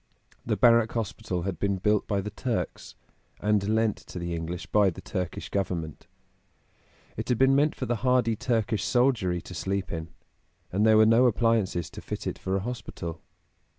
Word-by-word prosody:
The -, -, -1 dB
Barrack 115 Hz, -2 st, +5 dB
Hospital 95 Hz, -5 st, -3 dB
had 95 Hz, -3 st, -3 dB
been 100 Hz, -1 st, +1 dB
built 105 Hz, +2 st, +1 dB
by 100 Hz, -2 st, 0 dB
the 105 Hz, +2 st, -6 dB
Turks, 120 Hz, +2 st, -4 dB, 0.4 s
and 105 Hz, -1 st, +1 dB
lent 110 Hz, -1 st, +1 dB
to -, -, -11 dB
the 85 Hz, -1 st, -3 dB
English 85 Hz, +1 st, -4 dB
by 105 Hz, -2 st, +3 dB
the 85 Hz, -, -8 dB
Turkish 90 Hz, -4 st, -4 dB
Government; 85 Hz, -6 st, -3 dB, 1.1 s
it -, -, -4 dB
had 125 Hz, -, +2 dB
been 135 Hz, +2 st, +5 dB
meant 145 Hz, +2 st, +3 dB
for 130 Hz, -, -3 dB
the 120 Hz, -1 st, -1 dB
hardy 125 Hz, -1 st, +2 dB
Turkish 115 Hz, -4 st, 0 dB
soldiery 120 Hz, -9 st, +2 dB
to 90 Hz, -, -10 dB
sleep 95 Hz, +2 st, -2 dB
in, 80 Hz, -1 st, -5 dB, 0.6 s
and 105 Hz, +4 st, +2 dB
there 110 Hz, 0 st, +6 dB
were 110 Hz, -, +7 dB
no 115 Hz, +3 st, +5 dB
appliances 110 Hz, -7 st, +1 dB
to -, -, -9 dB
fit -, -, -6 dB
it -, -, -3 dB
for 95 Hz, 0 st, -2 dB
a 95 Hz, -, 0 dB
hospital. 85 Hz, -8 st, -6 dB
105 Hz, 180 wpm, -27 LUFS, 90-115 Hz, 1.1 s, were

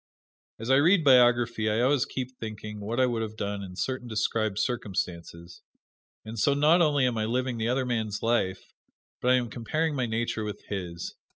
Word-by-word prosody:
As 115 Hz, +4 st, -3 dB
I 135 Hz, -, +6 dB
read 165 Hz, +4 st, +4 dB
biography 120 Hz, -4 st, +4 dB
I 110 Hz, +2 st, +1 dB
always 130 Hz, +1 st, +3 dB
keep 130 Hz, -1 st, -5 dB
thinking 105 Hz, -1 st, -7 dB
what 110 Hz, +4 st, -3 dB
I 130 Hz, -, +5 dB
would 120 Hz, -2 st, -1 dB
have 110 Hz, -1 st, -5 dB
done 100 Hz, -1 st, -3 dB
in 95 Hz, -2 st, -8 dB
certain 130 Hz, +4 st, -3 dB
described 110 Hz, -2 st, -1 dB
circumstances, 90 Hz, -7 st, -4 dB, 0.6 s
and 110 Hz, +1 st, -6 dB
so 140 Hz, +6 st, +3 dB
not 155 Hz, +5 st, +4 dB
only 145 Hz, -5 st, +3 dB
am 120 Hz, -3 st, 0 dB
I 110 Hz, -, 0 dB
living 125 Hz, +1 st, -1 dB
the 110 Hz, +1 st, 0 dB
other 130 Hz, +1 st, 0 dB
man's 110 Hz, -4 st, -2 dB
life, 105 Hz, -5 st, -1 dB, 0.5 s
but 125 Hz, -, +1 dB
I 130 Hz, -, +6 dB
am 120 Hz, -2 st, -1 dB
comparing 155 Hz, +7 st, -1 dB
my 125 Hz, -3 st, 0 dB
nature 110 Hz, 0 st, -2 dB
with 105 Hz, -1 st, -6 dB
his. 90 Hz, -4 st, -5 dB
115 Hz, 190 wpm, -27 LUFS, 105-130 Hz, 0.6 s, I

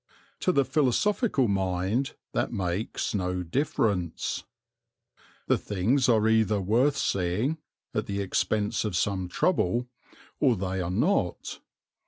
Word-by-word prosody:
To 185 Hz, -, +2 dB
the 140 Hz, -6 st, +2 dB
philosophical 145 Hz, -, +2 dB
mind 95 Hz, +6 st, 0 dB, 0.2 s
that -, -, -1 dB
makes 95 Hz, -1 st, -2 dB
no 90 Hz, -2 st, -1 dB
difference. 95 Hz, -, -1 dB, 1.0 s
The -, -, +2 dB
things 115 Hz, +7 st, +1 dB
are 110 Hz, -2 st, +4 dB
either 110 Hz, -2 st, +3 dB
worth 120 Hz, +9 st, +2 dB
seeing, 100 Hz, -, 0 dB, 0.3 s
at 105 Hz, -2 st, -1 dB
the 100 Hz, -1 st, -2 dB
expense 105 Hz, +2 st, 0 dB
of 105 Hz, -5 st, -1 dB
some 95 Hz, 0 st, 0 dB
trouble, 120 Hz, -, +1 dB, 0.5 s
or 130 Hz, -5 st, +4 dB
they 95 Hz, -1 st, -2 dB
are 85 Hz, -, -2 dB
not. 100 Hz, -, 0 dB
105 Hz, 120 wpm, -27 LUFS, 95-130 Hz, 1.0 s, are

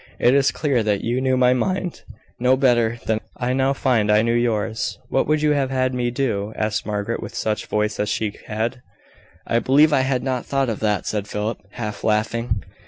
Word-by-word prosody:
It 120 Hz, -, +4 dB
is 140 Hz, -1 st, +4 dB
clear 140 Hz, -6 st, 0 dB
that 105 Hz, -2 st, 0 dB
you 120 Hz, +3 st, 0 dB
knew 130 Hz, -1 st, +2 dB
my 125 Hz, 0 st, +4 dB
mind 185 Hz, +6 st, -2 dB, 0.4 s
no 125 Hz, +2 st, +3 dB
better 120 Hz, -3 st, +2 dB
than 110 Hz, -1 st, +1 dB, 0.2 s
I 125 Hz, 0 st, -1 dB
now 135 Hz, +1 st, +2 dB
find 120 Hz, -6 st, +1 dB
I 105 Hz, +1 st, +4 dB
knew 115 Hz, 0 st, +1 dB
yours." 115 Hz, -2 st, -1 dB
"What -, -, +1 dB
would 155 Hz, 0 st, +1 dB
you 150 Hz, -, +4 dB
have 140 Hz, -3 st, +1 dB
had 130 Hz, -1 st, 0 dB
me 125 Hz, -1 st, 0 dB
do?" 115 Hz, -5 st, -2 dB
asked 110 Hz, 0 st, -2 dB
Margaret, 105 Hz, +2 st, -2 dB
with -, -, -8 dB
such 110 Hz, -1 st, -2 dB
voice 105 Hz, 0 st, -1 dB
as 105 Hz, -, 0 dB
she 105 Hz, -2 st, -1 dB
had. 115 Hz, +4 st, -2 dB, 0.6 s
"I 115 Hz, -, +1 dB
believe 145 Hz, +5 st, +4 dB
I 135 Hz, -, +4 dB
had 130 Hz, -1 st, 0 dB
not 130 Hz, -2 st, -1 dB
thought 135 Hz, -2 st, 0 dB
of 110 Hz, -, -3 dB
that," 105 Hz, -2 st, 0 dB
said 105 Hz, -1 st, -2 dB
Philip, 105 Hz, +2 st, -3 dB
half 105 Hz, -3 st, -5 dB
laughing. 110 Hz, 0 st, 0 dB
120 Hz, 205 wpm, -22 LUFS, 110-130 Hz, 0.6 s, It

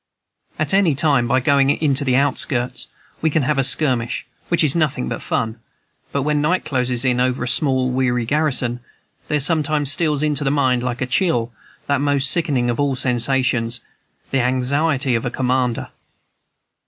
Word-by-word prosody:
At 155 Hz, +1 st, -1 dB
any 190 Hz, -7 st, +3 dB
time, 140 Hz, -4 st, +2 dB
by 130 Hz, -, +2 dB
going 140 Hz, 0 st, +2 dB
into 145 Hz, -1 st, +1 dB
the 130 Hz, -2 st, +1 dB
outskirts, 130 Hz, -2 st, -1 dB, 0.3 s
we 160 Hz, -, +2 dB
can 155 Hz, -1 st, 0 dB
have 140 Hz, +1 st, 0 dB
a -, -, +3 dB
skirmish, 125 Hz, -4 st, +1 dB, 0.2 s
which 170 Hz, -1 st, +2 dB
is 150 Hz, -1 st, +2 dB
nothing 150 Hz, -, 0 dB
but -, -, -4 dB
fun; 110 Hz, +1 st, -2 dB, 0.5 s
but 140 Hz, -, -1 dB
when 150 Hz, 0 st, 0 dB
night 175 Hz, +5 st, 0 dB
closes 125 Hz, -2 st, 0 dB
in 125 Hz, -1 st, +2 dB
over 125 Hz, 0 st, 0 dB
a -, -, -3 dB
small 130 Hz, +1 st, +2 dB
and 125 Hz, 0 st, -2 dB
weary 125 Hz, -2 st, 0 dB
garrison, 130 Hz, -3 st, 0 dB, 0.5 s
there 150 Hz, -, 0 dB
sometimes 150 Hz, -1 st, +1 dB
steals 150 Hz, -1 st, 0 dB
into 150 Hz, -1 st, 0 dB
my -, -, +2 dB
mind, 130 Hz, -3 st, +1 dB
like 125 Hz, -1 st, -3 dB
a -, -, +1 dB
chill, 120 Hz, -5 st, 0 dB, 0.3 s
that 140 Hz, -1 st, 0 dB
most 140 Hz, -2 st, +3 dB
sickening 145 Hz, -8 st, 0 dB
of 120 Hz, +2 st, -2 dB
all 140 Hz, -2 st, +1 dB
sensations, 125 Hz, -2 st, 0 dB, 0.5 s
the 135 Hz, -, +2 dB
anxiety 130 Hz, +2 st, +1 dB
of 115 Hz, -, 0 dB
a -, -, -1 dB
commander. 125 Hz, -1 st, -1 dB
135 Hz, 175 wpm, -20 LUFS, 125-150 Hz, 0.5 s, any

